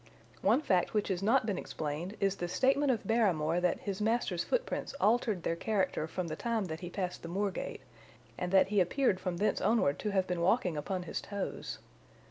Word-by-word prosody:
One 225 +9 +4
fact 185 - +1
which 210 -1 +1
has 185 -2 -1
not 225 +5 +3
been 205 -4 -1
explained 155 +7 -4
is 195 0 +1
the 175 - -2
statement 270 +9 +2
of 245 -4 0
Barrymore 180 -8 +2
that 180 -1 +1
his 200 0 -4
master's 215 -5 +1
footprints - - -2
altered 215 -3 +2
their 165 - 0
character 185 -4 0
from 180 +1 -3
the 155 - -4
time 230 +1 -1
that 160 -2 -5
he 175 -1 -6
passed 180 -1 -3
the 165 - -7
moor 195 +3 0
gate, - - -5 0.5
and 180 +5 -3
that 190 0 +5
he 205 -1 +2
appeared 195 +1 +2
from 180 -2 -3
thence 210 - +1
onward 215 -11 +2
to 210 - -2
have 190 -2 +1
been 180 -2 -2
walking 180 -1 +2
upon 180 +5 -3
his 175 - -4
toes. 200 -1 -5
190 Hz, 205 wpm, -32 LUFS, 175-220 Hz, 0.5 s, that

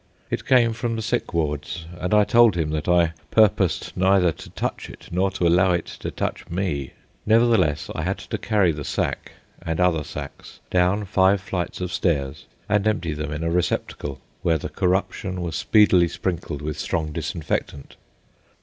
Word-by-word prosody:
It - - -3
came 120 -3 +4
from 115 +1 -2
the 110 - -3
sick 120 +2 -1
wards, 80 0 -2
and 90 - -3
I 105 0 +6
told 115 -4 +5
him 80 -2 -1
that 75 -1 -3
I 85 -2 +3 0.2
purposed 105 -4 +2
neither 95 -2 +4
to - - -11
touch - - -4
it, - - -12
nor 95 +3 +1
to 95 -2 -2
allow 90 +2 +4
it 85 - -1
to - - -4
touch - - -4
me. 85 -7 -2 0.3
Nevertheless, 110 -10 +3
I - - -3
had - - -1
to - - -5
carry 100 -5 +2
the 75 -2 -5
sack, - - -3 0.3
and 80 0 -3
other 90 -4 +2
sacks, 70 -1 -9
down 90 +3 +2
five 95 0 +3
flights 90 -2 -4
of 90 0 -3
stairs 70 -6 -1 0.2
and 105 0 +1
empty 90 -7 0
them 75 0 -4
in 75 +1 -4
a 85 - 0
receptacle 85 -5 -2 0.2
where 80 -1 +2
the - - -6
corruption 95 0 -1
was 85 -3 -3
speedily 95 -5 +4
sprinkled 85 -4 -4
with 75 0 -4
strong 80 -2 -2
disinfectant. 75 -3 -4
90 Hz, 175 wpm, -23 LUFS, 80-100 Hz, 0.3 s, I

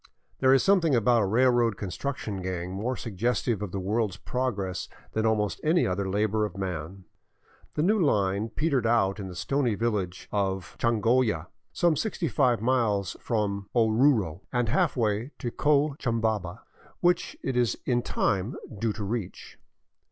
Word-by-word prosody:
There 130 -1 +4
is 135 - +5
something 180 -8 +4
about 120 0 +3
a 100 - +1
railroad 120 0 +3
construction 105 0 -4
gang 90 -1 -4
more 115 +7 -2
suggestive 115 +1 -1
of 105 -4 -4
the 100 - -3
world's 105 +1 -1
progress 105 -8 -3 0.2
than 110 0 +1
almost 105 -2 0
any 165 +3 +3
other 95 +1 -1
labor 105 +2 +1
of 100 -3 -4
man. 90 0 -5 0.7
The 150 - +1
new 210 +5 +3
line 105 - +1
petered 140 -3 0
out 105 -4 +2
in 95 - -5
the 90 - -8
stony 125 +4 0
village 100 -5 -2
of 95 -2 -2
Changolla, 115 -6 +1 0.2
some 170 -2 +2
sixty 185 -2 -2
five 120 -2 +2
miles 115 -7 +1
from 100 -4 -2
Oruro 110 - +3
and 120 -2 0
halfway 120 - 0
to 120 - -4
Cochabamba, 115 - 0 0.4
which 175 0 +1
it 135 - -2
is 120 -2 +1
in 120 -1 +2
time 100 0 -1 0.2
due 115 -1 0
to 105 - -5
reach. 100 -2 -5
110 Hz, 150 wpm, -27 LUFS, 100-130 Hz, 0.7 s, is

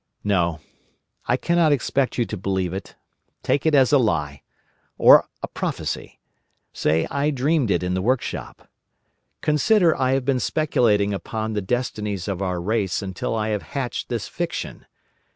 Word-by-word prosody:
"No. 85 -6 +1 0.7
I - - +2
cannot 170 -2 +2
expect 140 -1 0
you 120 - +2
to 110 - -5
believe 95 -2 -2
it. 95 0 -7 0.5
Take 145 +3 +1
it 155 - +4
as 135 0 +4
a 140 - +7
lie—or 75 - +2 0.2
a - - -1
prophecy. - - -4 0.5
Say 80 +2 +1
I 140 +1 +1
dreamed 140 -2 +1
it 90 -2 +1
in 90 0 -1
the 95 - 0
workshop. 125 +5 -2 0.7
Consider 165 +3 +3
I 130 0 +1
have 135 -1 0
been 135 -2 +1
speculating 110 -10 +1
upon 110 +2 -4
the 105 - -1
destinies 105 -3 -2
of 100 -2 -3
our 90 -2 -1
race, 100 0 -1
until 95 +3 -3
I 110 -1 -1
have 105 -2 -1 0.2
hatched 130 -3 -3
this - - -3
fiction. - - -5
110 Hz, 150 wpm, -23 LUFS, 95-135 Hz, 0.7 s, a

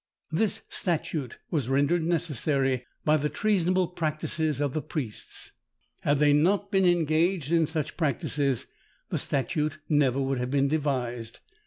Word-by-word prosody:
This 200 +6 0
statute 155 -7 -2
was 145 -8 0
rendered 145 +5 +2
necessary 140 -6 0 0.2
by 155 0 +5
the 150 0 -1
treasonable 185 0 +1
practices 155 -3 -1
of 145 -2 0
the 155 - -1
priests. 130 -8 -6 0.5
Had 145 0 +2
they 145 0 +4
not 195 +7 +2
been 190 -2 +3
engaged 165 -1 +2
in 165 -2 +4
such 155 -1 -3
practices, 140 -3 0 0.4
the - - -1
statute 150 +3 -1
never 140 -4 +3
would 135 -1 0
have 125 0 -2
been 140 0 +2
devised. 125 -6 -2
150 Hz, 140 wpm, -27 LUFS, 135-170 Hz, 0.5 s, by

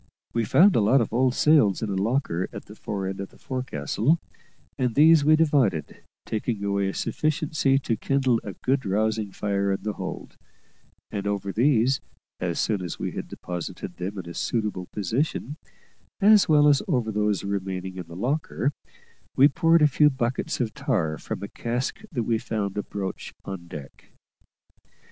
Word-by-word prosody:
We 115 -1 +1
found 190 - +5
a - - +4
lot 120 +7 +4
of 115 -2 -1
old 125 +1 +2
sails 130 - +4
in 105 - -2
a - - -1
locker 100 -3 0
at - - -8
the 105 - -12
fore 100 -2 -4
end 95 +1 -4
of 100 - -6
the - - -20
forecastle, 130 - -1 0.6
and 125 -3 -1
these 155 +1 +6
we 155 +2 +6
divided, 140 - +1 0.2
taking 110 -1 -2
away 100 -1 0
a - - -4
sufficiency 155 -3 +1
to 130 -4 -1
kindle 130 -2 +1
a 100 - -6
good 130 +5 0
rousing 110 +1 0
fire 100 0 -1
in 95 - -2
the 105 - -2
hold; - - -7 0.7
and 100 0 -3
over 100 -1 -2
these, 130 +2 +3 0.4
as 85 -2 -2
soon 105 -4 0
as 90 -3 -5
we - - -3
had - - -5
deposited 90 -1 -6
them 95 +3 -4
in 90 -3 -6
a 85 - -7
suitable 105 -5 -2
position, 130 - -2 0.6
as 210 -2 +6
well 150 -1 +6
as 145 -2 +5
over 120 -4 0
those 105 -2 0
remaining 95 -2 -3
in 90 -2 -6
the 85 - -10
locker, 135 - -1 0.6
we 135 - +7
poured 165 0 +3
a - - +8
few 150 +1 +4
buckets 130 -2 -2
of 115 -4 -1
tar 105 - -1
from - - -5
a - - -3
cask 120 - -3
we 115 -2 0
found 105 -4 -3
abroach 100 -2 -5
on 95 -3 -7
deck. 70 -5 -10
110 Hz, 170 wpm, -25 LUFS, 100-135 Hz, 0.7 s, a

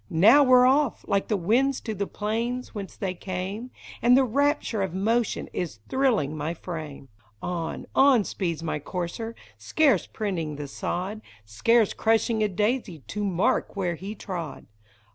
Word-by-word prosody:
Now 205 - +6
we 255 -2 +4
're 250 0 +8
off 270 0 +2
— - - -27
like 200 -1 +1
the 210 - +1
winds 250 +9 +2
to 220 - -4
the 200 -1 -3
plains 230 +4 -3
whence 200 -3 -7
they 190 -3 -2
came; 190 +6 -5 0.3
And 245 +2 +6
the 270 - +5
rapture 280 -3 +1
of 190 -2 -2
motion 225 +4 0
is 170 -11 -3
thrilling 235 - +1
my 155 +3 -3
frame! 155 -6 -7 0.3
On, 170 +1 -4
on 265 -5 +5
speeds 170 -5 -3
my 155 -2 -2
courser, 180 +8 -5 0.2
scarce 230 - +2
printing 170 -8 -3
the 145 0 -6
sod, 185 +9 -4 0.2
Scarce 215 - +2
crushing 225 0 +1
a 215 - +3
daisy 210 - -1
to 210 - -3
mark 190 +1 +1
where 185 -3 -1
he 195 +6 -7
trod 175 -6 -6
205 Hz, 160 wpm, -26 LUFS, 175-235 Hz, 0.3 s, re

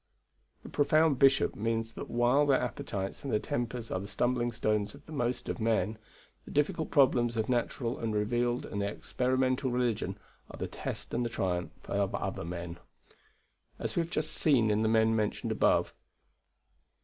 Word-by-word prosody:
The - - -9
profound 155 -1 +3
bishop 135 0 +4
means 115 +1 -1
that - - -7
while 125 +5 +3
their 135 -2 +4
appetites 100 -4 -4
and 140 - -3
their 105 - +2
tempers 120 0 -3
are 95 - 0
the 100 - -6
stumbling 120 +3 0
stones 105 -1 -1
of 145 - -16
the - - -13
most 125 -4 -2
of - - -3
men, 110 -1 +1 0.4
the - - -13
difficult 150 +2 0
problems 120 -5 +3
of 110 - 0
natural 120 0 -1
and 115 -1 -2
revealed 120 +3 0
and 100 - -3
experimental 130 +5 0
religion 115 -6 -1 0.3
are - - -9
the - - -3
test - - -6
and 120 - +1
the 120 - -1
triumph 90 -5 -3
of 100 -1 0
other - - -3
men. 85 0 -6 1.0
As - - -4
we 170 - +3
have 165 - -4
just - - -1
seen 120 -8 +3
in 105 +1 +2
the 110 - +2
men 110 0 +4
mentioned 105 -2 -1
above. - - +2
120 Hz, 175 wpm, -31 LUFS, 105-130 Hz, 1.0 s, bishop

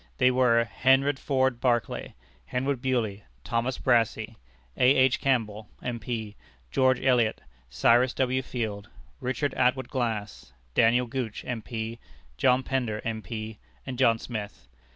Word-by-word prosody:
They 125 - +4
were: 125 -2 +4
Henry 135 +4 +3
Ford 130 -2 0
Barclay, 120 -3 0 0.3
Henry 135 +3 -1
Bewley, 120 -6 -1 0.2
Thomas 120 +2 -1
Brassey, 115 -2 +1 0.4
A. 130 +2 +5
H. 130 -1 +4
Campbell, 110 -5 0
M.P., 115 -3 -4 0.4
George 130 -1 +3
Elliot, 125 -4 +2 0.3
Cyrus 120 - +3
W. 130 0 +1
Field, 110 -4 -4 0.3
Richard 130 +2 -1
Atwood 130 0 +1
Glass, 115 -5 -3 0.2
Daniel 120 +2 +4
Gooch, 120 -3 -4
M.P., 115 -1 -5 0.4
John 125 - +3
Pender, 120 -6 -1
M.P., 110 -1 -5 0.3
and 130 -1 -6
John 115 -3 +4
Smith. 105 - -7
120 Hz, 120 wpm, -27 LUFS, 110-130 Hz, 0.4 s, A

